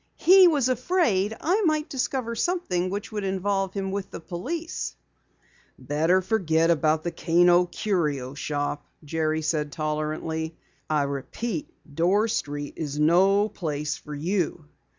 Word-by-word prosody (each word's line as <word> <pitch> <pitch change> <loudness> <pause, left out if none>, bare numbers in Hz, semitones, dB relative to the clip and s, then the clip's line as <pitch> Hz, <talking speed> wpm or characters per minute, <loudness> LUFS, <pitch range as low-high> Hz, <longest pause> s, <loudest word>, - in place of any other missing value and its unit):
He 370 +2 +7
was 290 -7 +2
afraid 240 - +1
I 375 +7 +2
might 310 -5 +1
discover 255 -3 -2
something 225 - -1
which 200 +3 -5
would 210 -2 -3
involve 195 0 -1
him 195 -1 -2
with 200 -1 -4
the - - -7
police!" 275 - -5 0.8
"Better 165 +6 +1
forget 165 -6 +2 0.3
the 175 - -2
Kano 175 +1 +4
Curio 150 -11 -1
Shop," 145 0 -3 0.2
Jerry 155 +1 -1
said 150 -2 -1
tolerantly. 155 +1 -3 0.3
"I 150 -2 +2
repeat, 145 - -4 0.2
Dorr 185 +8 +2
Street 145 -6 -3
is 150 -3 -4
no 190 +6 +4
place 150 -6 -3
for 150 -1 -9
you." 170 0 -1
175 Hz, 130 wpm, -25 LUFS, 155-215 Hz, 0.8 s, He